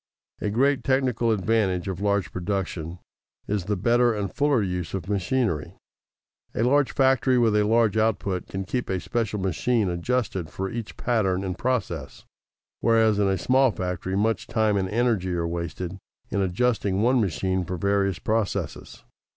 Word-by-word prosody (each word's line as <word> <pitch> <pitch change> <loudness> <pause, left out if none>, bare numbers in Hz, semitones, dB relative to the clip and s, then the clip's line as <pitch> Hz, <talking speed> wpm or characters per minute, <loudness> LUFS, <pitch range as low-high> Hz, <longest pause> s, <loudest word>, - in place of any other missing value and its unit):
A 105 - 0
great 135 +6 +2
technical 130 -3 +1
advantage 100 -3 +1
of 95 -1 -4
large 100 -3 0
production 90 -3 -3 0.5
is 100 -3 -1
the 105 0 -1
better 120 +3 +3
and 100 -3 -3
fuller 140 -6 +2
use 90 -1 -3
of 90 -2 -5
machinery. 105 - -1 0.8
A 115 - +1
large 140 +3 +3
factory 130 -1 +3
with 115 -3 +3
a 105 - +4
large 110 0 +3
output 100 -4 0
can 95 0 -4
keep 125 +6 -3
a 95 - 0
special 105 +4 -2
machine 95 +3 0
adjusted 90 -1 -1
for 95 0 -4
each 115 -2 -6
pattern 100 -6 0
and 95 -2 -3
process, 125 +4 -3 0.5
whereas 110 -2 +3
in 100 - +3
a 95 0 +1
small 130 +7 +3
factory 95 -2 -3
much 110 +3 0
time 110 -2 +1
and 95 -1 0
energy 105 -5 +1
are 85 -1 -1
wasted 85 +2 -4 0.3
in 100 - 0
adjusting 100 0 +1
one 125 +1 +4
machine 95 0 0
for 90 +1 -4
various 100 0 +1
processes. 110 -2 -3
105 Hz, 160 wpm, -25 LUFS, 95-120 Hz, 0.8 s, a